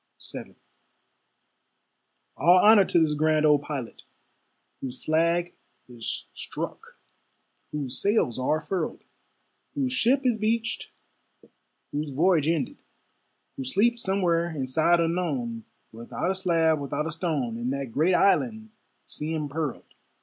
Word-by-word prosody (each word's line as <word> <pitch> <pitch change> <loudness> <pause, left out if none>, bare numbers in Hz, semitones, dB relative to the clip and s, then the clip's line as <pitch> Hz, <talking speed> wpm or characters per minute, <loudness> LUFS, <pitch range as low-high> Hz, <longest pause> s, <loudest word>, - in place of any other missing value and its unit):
VII - - -8 1.8
All 175 +2 +5
honor 210 -2 +8
to - - +1
this 155 -2 +2
grand 155 +1 +2
old 150 -1 +5
Pilot, 140 -5 -6 0.8
Whose 130 -1 -7
flag 170 +2 +1 0.3
is 120 -2 -5
struck, - - -7 0.7
whose 140 -4 -3
sails 200 - +1
are 150 +5 +1
furled, 180 -1 -3 0.7
Whose 270 -3 0
ship 260 +2 +2
is 240 -3 +2
beached, 225 +2 -1 1.0
whose 150 +1 -3
voyage 155 +2 +2
ended; 165 -3 -1 0.8
Who 135 - -3
sleeps 230 - +1
somewhere 175 -3 +1
in 145 -5 -3
sod 160 +6 +3
unknown, 150 -10 -1 0.3
Without 115 +10 -3
a - - -2
slab, 165 -4 +2
without 140 +1 -3
a 165 - -3
stone, 155 -8 -2
In 120 +2 -2
that 135 -2 -3
great 160 +9 +2
Island, 220 +3 +2 0.3
sea 155 +2 -4
impearled. 150 -2 -3
160 Hz, 120 wpm, -26 LUFS, 140-185 Hz, 1.8 s, honor